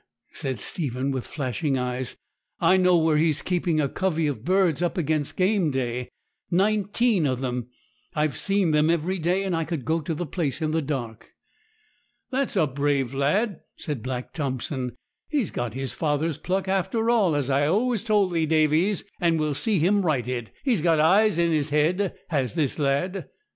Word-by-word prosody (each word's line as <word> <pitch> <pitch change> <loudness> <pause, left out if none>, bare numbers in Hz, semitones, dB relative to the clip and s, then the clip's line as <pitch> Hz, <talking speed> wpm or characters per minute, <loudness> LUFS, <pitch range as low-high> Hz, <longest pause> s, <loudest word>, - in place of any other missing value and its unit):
said 130 -4 -3
Stephen, 135 - -2
with 130 -2 -3
flashing 140 0 -2
eyes; 125 0 -3 0.4
'I 180 +2 +4
know 180 -1 +4
where 160 -2 +3
he's 155 -1 +2
keeping 175 -3 0
a 145 - +2
covey 165 0 -1
of 140 -7 -2
birds 180 -2 +2
up 175 +2 -1
against 155 -3 -1
game 185 -3 +2
day 125 -2 -2 0.4
nineteen 205 0 +2
of 130 -2 -1
them. 125 -2 -3 0.5
I've 150 -1 0
seen 195 -4 +1
them 150 +1 +3
every 170 +3 0
day, 180 +4 +1
and 190 -3 -1
I 165 - 0
could 160 -6 -4
go 160 +4 +1
to 155 +1 -3
the 175 - -3
place 150 -3 -2
in 155 -2 -1
the 160 +1 +1
dark.' 125 -6 -5 1.0
'That's 265 -2 -1
a 185 - +4
brave 140 -2 0
lad!' 180 - +1 0.2
said 145 -6 -4
Black 125 +1 -5
Thompson; 130 -3 -3 0.3
'he's 280 - 0
got 120 -3 -3
his 135 0 -3
father's 155 0 -1
pluck 190 +1 -1
after 210 +5 +1
all, 200 -10 +3
as 140 -2 0
I've 145 +2 +2
always 225 +4 +1
told 205 -5 +2
thee, 160 -2 +1
Davies, 160 +5 +2 0.2
and 165 -2 +2
we'll 155 -1 0
see 200 +9 0
him 195 +6 +3
righted. 125 - -1
He's 245 - +2
got 165 -1 +3
his 155 - +3
eyes 200 +3 +4
in 170 -1 +2
his 155 -2 +1
head, 170 +6 +1
has 140 -5 -1
this 155 -3 0
lad!' 150 +7 -1
160 Hz, 180 wpm, -25 LUFS, 140-185 Hz, 1.0 s, I